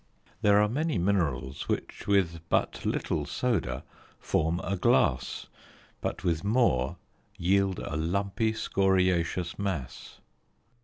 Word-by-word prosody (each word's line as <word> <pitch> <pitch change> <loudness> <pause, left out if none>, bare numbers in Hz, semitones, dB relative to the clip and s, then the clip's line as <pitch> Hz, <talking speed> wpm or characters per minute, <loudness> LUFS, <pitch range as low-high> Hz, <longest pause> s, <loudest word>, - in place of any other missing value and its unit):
There 105 0 +5
are 105 - +4
many 145 +3 -1
minerals 80 -9 -1
which - - -3
with 95 -5 +2
but - - 0
little 75 - -1
soda 120 +5 -1 0.4
form 80 +2 0
a 100 - -1
glass, 75 -7 +2 0.6
but - - -3
with 85 -2 0
more 100 - +2 0.4
yield 95 +1 +2
a - - -4
lumpy 100 +7 0
scoriacious 90 -4 +1
mass. 95 -11 -4
95 Hz, 110 wpm, -28 LUFS, 80-100 Hz, 0.6 s, There